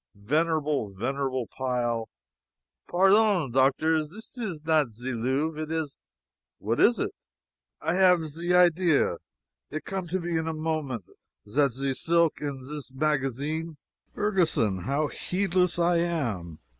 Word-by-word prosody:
Venerable, 150 Hz, +1 st, 0 dB
venerable 130 Hz, +3 st, -2 dB
pile 120 Hz, -4 st, -1 dB, 0.4 s
" -, -, -30 dB
"Pairdon, 195 Hz, -, +4 dB
Doctor, 135 Hz, +5 st, +3 dB
zis 205 Hz, +12 st, -9 dB
is 185 Hz, -11 st, -5 dB
not 150 Hz, -8 st, +2 dB
ze 125 Hz, +3 st, -4 dB
Louvre 135 Hz, +7 st, -1 dB
it 155 Hz, 0 st, -5 dB
is 160 Hz, -3 st, -2 dB, 0.3 s
" -, -, -65 dB
"What 115 Hz, +3 st, -2 dB
is 240 Hz, -, +5 dB
it?" -, -, -1 dB, 0.7 s
"I 160 Hz, -, +1 dB
have 180 Hz, -3 st, +4 dB
ze 165 Hz, +4 st, -3 dB
idea 175 Hz, -, +4 dB, 0.5 s
it 155 Hz, +1 st, -5 dB
come 190 Hz, -2 st, -4 dB
to 185 Hz, +3 st, -1 dB
me 170 Hz, -2 st, -1 dB
in 160 Hz, -, -3 dB
a 160 Hz, -, -2 dB
moment 155 Hz, -, -2 dB, 0.4 s
zat 135 Hz, +4 st, +2 dB
ze 135 Hz, +2 st, -1 dB
silk 170 Hz, +3 st, +2 dB
in 140 Hz, -3 st, -4 dB
zis 145 Hz, -1 st, -6 dB
magazin 150 Hz, +3 st, -1 dB, 0.2 s
" -, -, -43 dB
"Ferguson, 165 Hz, -, +1 dB
how 140 Hz, +3 st, +1 dB
heedless 180 Hz, +1 st, 0 dB
I 170 Hz, 0 st, +3 dB
am. 120 Hz, -, -2 dB
155 Hz, 145 wpm, -27 LUFS, 130-170 Hz, 0.7 s, is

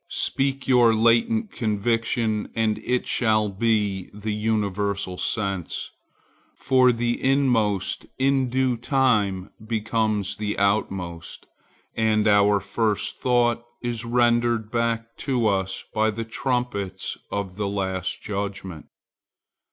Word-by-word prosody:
Speak 135 Hz, 0 st, 0 dB
your 120 Hz, -3 st, +5 dB
latent 115 Hz, -, +2 dB
conviction, 110 Hz, 0 st, 0 dB
and 110 Hz, -2 st, +1 dB
it 125 Hz, 0 st, -1 dB
shall 110 Hz, -3 st, +2 dB
be 100 Hz, -2 st, 0 dB
the 105 Hz, +1 st, -3 dB
universal 100 Hz, -3 st, -1 dB
sense; 100 Hz, -3 st, -3 dB, 0.6 s
for 130 Hz, -1 st, +4 dB
the 120 Hz, 0 st, -1 dB
inmost 120 Hz, -8 st, +1 dB
in 135 Hz, -1 st, +2 dB
due 130 Hz, -1 st, +1 dB
time 115 Hz, -8 st, +1 dB
becomes 110 Hz, -2 st, -1 dB
the 105 Hz, -1 st, -3 dB
outmost, 95 Hz, -4 st, -2 dB, 0.5 s
and 110 Hz, -1 st, +2 dB
our 105 Hz, 0 st, +5 dB
first 110 Hz, 0 st, -1 dB
thought 120 Hz, -2 st, +2 dB, 0.2 s
is 120 Hz, -2 st, -2 dB
rendered 120 Hz, -2 st, +2 dB
back 115 Hz, -1 st, -1 dB
to 125 Hz, -4 st, -1 dB
us 95 Hz, -2 st, 0 dB
by 110 Hz, 0 st, +2 dB
the 115 Hz, +1 st, -4 dB
trumpets 115 Hz, -6 st, -2 dB, 0.2 s
of 100 Hz, -2 st, -3 dB
the 105 Hz, -1 st, -1 dB
Last 95 Hz, -2 st, -3 dB
Judgment. 100 Hz, -5 st, -5 dB
110 Hz, 110 wpm, -24 LUFS, 100-120 Hz, 0.6 s, your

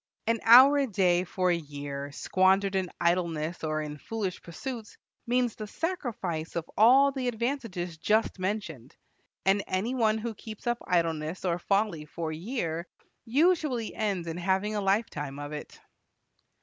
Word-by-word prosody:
An 230 Hz, 0 st, +1 dB
hour 260 Hz, +5 st, +9 dB
a 275 Hz, -, +1 dB
day 180 Hz, -4 st, +2 dB
for 185 Hz, 0 st, 0 dB
a -, -, +3 dB
year 145 Hz, -3 st, -6 dB
squandered 190 Hz, +5 st, +2 dB
in 190 Hz, -2 st, 0 dB
idleness 170 Hz, -2 st, 0 dB
or 155 Hz, -1 st, -1 dB
in 150 Hz, -1 st, -7 dB
foolish 205 Hz, -2 st, -4 dB
pursuits 225 Hz, +6 st, -7 dB, 0.3 s
means 245 Hz, -1 st, +1 dB
the 215 Hz, -, -7 dB
sacrifice 210 Hz, -, -3 dB
of 170 Hz, -1 st, -3 dB
all 265 Hz, +6 st, +6 dB
the 265 Hz, -2 st, -3 dB
advantages 225 Hz, -, -3 dB
just 215 Hz, +2 st, +1 dB
mentioned. 185 Hz, -, -4 dB, 0.5 s
And 195 Hz, +1 st, +3 dB
any 200 Hz, +7 st, -1 dB
one 220 Hz, -4 st, +2 dB
who 225 Hz, +1 st, -4 dB
keeps 215 Hz, 0 st, -10 dB
up 240 Hz, 0 st, 0 dB
idleness 165 Hz, 0 st, 0 dB
or 175 Hz, -1 st, 0 dB
folly 195 Hz, -5 st, 0 dB
for 160 Hz, +1 st, -5 dB
a -, -, -4 dB
year, 170 Hz, -3 st, -3 dB, 0.4 s
usually 285 Hz, -3 st, +1 dB
ends 195 Hz, -6 st, -2 dB
in 165 Hz, 0 st, -4 dB
having 190 Hz, +4 st, 0 dB
a 205 Hz, -, 0 dB
lifetime 195 Hz, -9 st, -1 dB
of 145 Hz, 0 st, -6 dB
it. 150 Hz, -1 st, -8 dB
190 Hz, 155 wpm, -28 LUFS, 165-230 Hz, 0.5 s, hour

